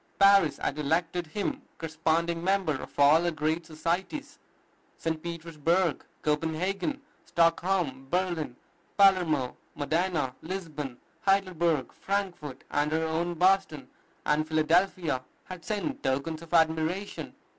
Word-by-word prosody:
Paris 195 Hz, -6 st, +6 dB
had 145 Hz, -, -2 dB
elected 165 Hz, +3 st, 0 dB
him 210 Hz, -, -3 dB, 0.2 s
corresponding 165 Hz, +1 st, 0 dB
member 190 Hz, -4 st, +2 dB
of -, -, -11 dB
all 145 Hz, +3 st, +6 dB
her 175 Hz, -, +1 dB
great 160 Hz, +1 st, -1 dB
societies. 190 Hz, -, -3 dB, 0.6 s
St. 160 Hz, -1 st, -2 dB
Petersburg, 170 Hz, 0 st, 0 dB, 0.2 s
Copenhagen, 170 Hz, -, -1 dB, 0.2 s
Stockholm, 165 Hz, -5 st, +1 dB
Berlin, 175 Hz, -7 st, -1 dB, 0.4 s
Palermo, 175 Hz, -10 st, +4 dB, 0.2 s
Modena, 160 Hz, -2 st, 0 dB
Lisbon, 155 Hz, -8 st, -5 dB, 0.3 s
Heidelberg, 175 Hz, -7 st, +2 dB
Frankfort, 185 Hz, -9 st, -3 dB
and 145 Hz, +1 st, +1 dB
our 160 Hz, +1 st, +1 dB
own 165 Hz, +2 st, -1 dB
Boston 180 Hz, -6 st, +2 dB, 0.4 s
and 155 Hz, +1 st, +2 dB
Philadelphia 160 Hz, -2 st, +2 dB, 0.2 s
had 185 Hz, -2 st, -9 dB
sent 215 Hz, +7 st, -3 dB
tokens 140 Hz, +4 st, -1 dB
of 165 Hz, -, -12 dB
admiration. 165 Hz, +4 st, +1 dB
165 Hz, 110 wpm, -28 LUFS, 155-185 Hz, 0.6 s, Paris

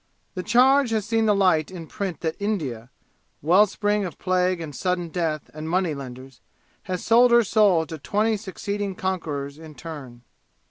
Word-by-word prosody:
The 185 Hz, -, -4 dB
charge 255 Hz, +6 st, +4 dB
has 220 Hz, -3 st, -1 dB
seen 225 Hz, 0 st, +1 dB
the 210 Hz, -, +4 dB
light 180 Hz, -6 st, +3 dB
in 180 Hz, -3 st, -8 dB
print 190 Hz, +1 st, -5 dB
that 160 Hz, -1 st, -2 dB
India 145 Hz, -, -3 dB, 0.5 s
well 185 Hz, +7 st, +5 dB
spring 205 Hz, +1 st, 0 dB
of 175 Hz, -6 st, -6 dB
plague 185 Hz, -1 st, +1 dB
and 155 Hz, -4 st, -7 dB
sudden 180 Hz, -2 st, -1 dB
death 160 Hz, -3 st, -3 dB
and 155 Hz, +1 st, -6 dB
money 180 Hz, -2 st, +1 dB
lenders 130 Hz, -2 st, -9 dB, 0.4 s
has 185 Hz, -2 st, -4 dB
sold 240 Hz, +2 st, +6 dB
her 235 Hz, 0 st, +6 dB
soul 200 Hz, -6 st, +3 dB
to 160 Hz, 0 st, -8 dB
twenty 215 Hz, +8 st, +1 dB
succeeding 200 Hz, -1 st, -4 dB
conquerors 155 Hz, -8 st, -3 dB
in 160 Hz, -2 st, -12 dB
turn. 135 Hz, -8 st, -9 dB
180 Hz, 170 wpm, -24 LUFS, 155-205 Hz, 0.5 s, sold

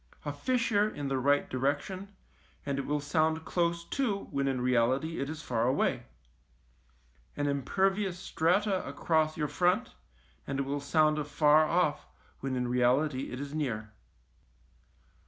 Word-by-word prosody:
A 145 Hz, -, -2 dB
fissure 215 Hz, -, +1 dB
in 145 Hz, -8 st, -5 dB
the 135 Hz, -1 st, 0 dB
right 145 Hz, +2 st, +2 dB
direction, 145 Hz, +9 st, -2 dB, 0.6 s
and 140 Hz, -1 st, -1 dB
it 140 Hz, -, -4 dB
will 150 Hz, 0 st, 0 dB
sound 160 Hz, +2 st, 0 dB
close 170 Hz, -1 st, 0 dB
to, 220 Hz, -8 st, -1 dB
when 140 Hz, 0 st, 0 dB
in 135 Hz, -2 st, 0 dB
reality 125 Hz, +6 st, +1 dB
it 140 Hz, -, -2 dB
is 155 Hz, 0 st, -6 dB
far 120 Hz, -1 st, 0 dB
away; 130 Hz, -, 0 dB, 1.3 s
an 145 Hz, -, 0 dB
impervious 190 Hz, +7 st, 0 dB
strata 190 Hz, +2 st, +1 dB
across 155 Hz, -1 st, 0 dB
your 150 Hz, -1 st, 0 dB
front, 175 Hz, +5 st, +1 dB, 0.5 s
and 135 Hz, -, -2 dB
it -, -, +1 dB
will 140 Hz, +1 st, -2 dB
sound 155 Hz, +1 st, +2 dB
afar 150 Hz, +1 st, +4 dB
off, 165 Hz, -3 st, +1 dB, 0.3 s
when 135 Hz, -1 st, -3 dB
in 125 Hz, -1 st, -1 dB
reality 130 Hz, +3 st, +1 dB
it 125 Hz, -, -5 dB
is 140 Hz, 0 st, -6 dB
near. 110 Hz, -8 st, -3 dB
150 Hz, 145 wpm, -30 LUFS, 135-170 Hz, 1.3 s, afar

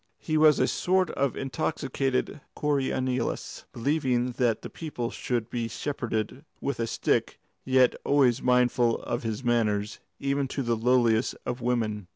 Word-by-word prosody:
He 155 Hz, -, -3 dB
was 155 Hz, -2 st, +6 dB
a 130 Hz, -, +3 dB
sort 185 Hz, 0 st, +1 dB
of 140 Hz, -1 st, -1 dB
intoxicated 135 Hz, +1 st, -2 dB
Coriolanus, 130 Hz, -3 st, -1 dB
believing 125 Hz, -1 st, 0 dB
that 120 Hz, -4 st, +1 dB
the -, -, -6 dB
people 125 Hz, -7 st, -4 dB
should 120 Hz, -3 st, -2 dB
be 120 Hz, -2 st, -2 dB
shepherded 125 Hz, -1 st, -3 dB, 0.2 s
with 140 Hz, -, -3 dB
a 115 Hz, -, 0 dB
stick, -, -, 0 dB, 0.3 s
yet 130 Hz, -1 st, +4 dB
always 135 Hz, -4 st, +3 dB
mindful 125 Hz, -1 st, +3 dB
of 120 Hz, -, -2 dB
his 115 Hz, +2 st, -4 dB
manners, 105 Hz, -4 st, 0 dB, 0.2 s
even 140 Hz, 0 st, 0 dB
to 135 Hz, +1 st, -3 dB
the 120 Hz, -1 st, +1 dB
lowliest 115 Hz, 0 st, +2 dB
of 120 Hz, +1 st, -3 dB
women. 110 Hz, -5 st, -1 dB
125 Hz, 145 wpm, -27 LUFS, 115-140 Hz, 0.3 s, was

